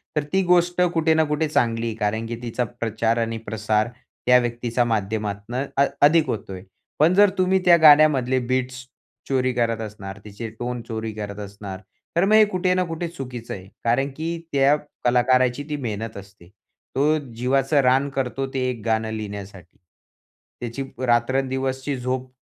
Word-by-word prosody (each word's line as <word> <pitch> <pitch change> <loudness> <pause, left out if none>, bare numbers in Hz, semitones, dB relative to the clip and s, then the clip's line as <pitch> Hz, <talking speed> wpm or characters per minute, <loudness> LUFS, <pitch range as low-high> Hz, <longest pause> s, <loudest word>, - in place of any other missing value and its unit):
तर 150 - +1
ती 190 - +4
गोष्ट 175 0 +3
कुठे 160 -1 +3
ना, 160 0 +3
कुठे 150 +1 0
चांगली 115 -5 0
आहे. 115 - -3
कारण 110 +1 -1
की 120 - -4
तिचा 120 +1 -2
प्रचार 115 -1 -1
आणि 115 -1 -1
प्रसार 110 +1 0 0.4
त्या 125 0 +7
व्यक्तीच्या 120 0 -1
माध्यमातनं 110 +2 -2
अ 140 - +5 0.2
अधिक 160 +1 +4
होतोय. 95 -3 -5 0.4
पण 160 +4 +5
जर 205 +2 +6
तुम्ही 185 +1 +3
त्या 175 -1 +7
गाण्यामधले 145 -4 +6
बीट्स 130 +1 -2 0.4
चोरी 130 -1 +1
करत 115 -2 0
असणार, 100 -3 -7
तिचे 105 +2 -7
टोन 120 0 -3
चोरी 110 -1 -4
करत 105 -1 -6
असणार, 100 -1 -7 0.4
तर 170 +3 +3
मग 210 - +2
हे 215 0 +7
कुठे 185 -2 0
ना, 185 0 +1
कुठे 165 0 -4
चुकीचं 125 -8 -7
आहे. 95 -1 -9 0.2
कारण 125 +4 +1
की 165 +2 -3
त्या 140 +1 +4 0.3
कलाकाराची 125 +2 +3
ती 150 - -1
मेहनत 110 0 -5
असते. 100 -2 -13 0.5
तो 150 +3 +3 0.2
जीवाचं 135 +4 +2
रान 135 +2 +3
करतो 135 0 -2
ते 135 - -1
एक 120 -3 -5
गाणं 110 -1 0
लिहिण्यासाठी. 100 -4 -8 0.8
त्याची 120 +3 -4 0.2
रात्रंदिवसची 130 +3 0
झोप 130 +1 -3
125 Hz, 160 wpm, -23 LUFS, 110-140 Hz, 0.8 s, त्या